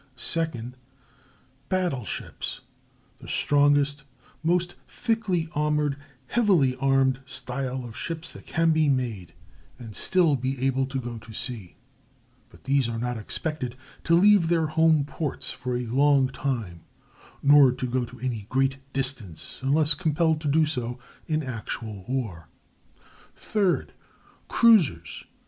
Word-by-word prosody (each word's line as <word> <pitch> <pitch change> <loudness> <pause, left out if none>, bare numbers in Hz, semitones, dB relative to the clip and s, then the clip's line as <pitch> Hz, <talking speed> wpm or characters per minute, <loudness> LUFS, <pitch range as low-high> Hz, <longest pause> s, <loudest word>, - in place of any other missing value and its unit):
Second, 125 -4 -2 0.9
battle 180 - 0
ships—the - - -8
strongest, 145 0 +2 0.4
most 175 +2 +1
thickly 215 -8 -1
armored, 150 -1 +1 0.3
heavily 180 - +3
armed 135 -1 +2
style 130 0 -3
of 115 -2 -9
ships 165 0 -5
that - - -13
can 165 0 +2
be 155 -2 +3
made, 115 -11 -2 0.4
and 115 -4 -10
still 170 -6 +3
be 130 +1 -3
able 135 0 +1
to 135 0 -3
go 120 -2 -6
to 110 +1 -13
sea; 110 -6 -6 0.7
but - - -19
these 135 -2 +1
are 115 - -3
not 125 +1 -2
expected 125 +3 -4 0.3
to 165 - +3
leave 195 -1 +5
their 165 -1 +2
home 155 -1 +3
ports 150 -1 -3
for 125 0 -3
a 125 - -3
long 135 +2 +3
time, 115 - -3 0.6
nor 140 -2 +7
to 125 - -4
go 125 0 0
to 125 +1 -10
any 115 -6 -3
great 135 +1 +1 0.2
distance 130 - -1
unless 150 +3 +3
compelled 160 -1 +1
to 155 - -3
do 155 +2 +4
so 125 -5 -3 0.3
in 155 -1 0
actual 110 -5 -6
war. 110 - -3 0.9
Third, 200 -4 0 0.5
cruisers. 185 - +3
135 Hz, 130 wpm, -26 LUFS, 125-160 Hz, 0.9 s, nor